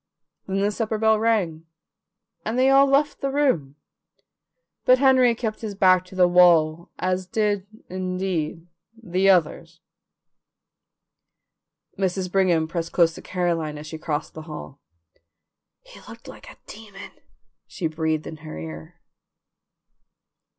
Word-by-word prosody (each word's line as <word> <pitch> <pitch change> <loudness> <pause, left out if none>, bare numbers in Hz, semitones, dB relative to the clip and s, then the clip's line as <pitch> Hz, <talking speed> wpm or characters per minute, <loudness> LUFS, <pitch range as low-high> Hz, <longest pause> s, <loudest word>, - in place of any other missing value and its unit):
Then 195 0 -1
the 205 +1 +1
supper 220 0 -2
bell 220 0 +3
rang, 185 -8 0 0.8
and 220 +3 -3
they 260 +1 +4
all 275 +1 +6
left 280 +2 +1
the 275 - -1
room, 255 - 0 1.1
but 255 - +5
Henry 260 -3 +4
kept 220 -2 -4
his 210 -3 -5
back 185 -2 +4
to 185 - -14
the 180 -1 +5
wall, 170 -2 +4
as 185 0 -2
did, 205 -1 -1 0.2
indeed, 185 -3 -3 0.3
the 190 -2 +1
others. 165 -2 +1 2.2
Mrs. 185 -1 -1
Brigham 180 -5 +2
pressed 165 0 -4
close 165 -2 +3
to - - -11
Caroline 170 -4 -2
as 150 - -9
she 160 +1 -8
crossed 155 0 -4
the 160 - -8
hall. 75 - -9 1.0
"He - - -15
looked - - -13
like - - -12
a - - -14
demon!" 205 -2 -11 0.6
she 180 - -6
breathed 155 -1 -1
in 160 - -8
her 155 - -9
ear. 80 0 -9
185 Hz, 130 wpm, -23 LUFS, 160-215 Hz, 2.2 s, all